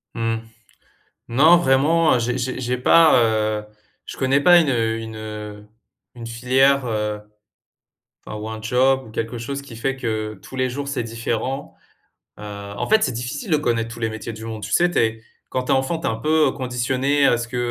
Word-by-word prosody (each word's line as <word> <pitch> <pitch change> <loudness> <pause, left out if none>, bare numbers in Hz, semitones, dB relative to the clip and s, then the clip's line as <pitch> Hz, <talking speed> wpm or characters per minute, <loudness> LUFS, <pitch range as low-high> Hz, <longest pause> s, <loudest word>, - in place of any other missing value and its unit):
Mmh. 115 0 -1 0.9
Non, 150 +9 +6
vraiment, 155 0 +3
j'ai 120 +1 -1
j'ai 130 +1 -3
j'ai 125 0 -1
pas, 160 +5 +5 0.5
heu, - - -13 0.4
je - - -9
connais 135 +1 +2
pas 175 +1 +7
une, 160 - +1
heu 115 -2 0
une 110 -1 -7
heu, 105 -1 -8 0.5
une 120 -2 -9
filière, 130 +4 +2
heu, 105 -2 -2 1.1
enfin, 105 - -6
ou 105 +1 -6
un 110 0 -6
job 130 +3 +2
ou - - -13
quelque 115 +2 -4
chose 140 +4 -5
qui 140 -4 -12
fait 135 +4 -2
que, 110 -3 -3
tous - - -11
les 130 0 0
jours, 140 +3 -5
c'est 140 -3 -2
différent. 115 +4 -4 0.6
Heu, - - -11
en 100 -1 -6
fait, 220 0 +4
c'est - - +2
difficile 120 - -5
de 155 - +4
connaître 115 -5 -1
tous 120 - -9
les 115 -1 -1
métiers 110 +1 -6
du 110 0 -9
monde. 110 -1 -6
Tu - - -6
sais, 175 - +3
tu - - -1
es 110 0 0 0.3
quand 130 0 -2
tu - - 0
es - - +5
enfant, 135 +5 0
tu 165 - -4
es - - +1
un - - -1
peu 150 +3 +2
conditionné 130 +2 0
à 120 - +4
ce 115 0 -4
que, 125 - -6
125 Hz, 205 wpm, -21 LUFS, 115-135 Hz, 1.1 s, pas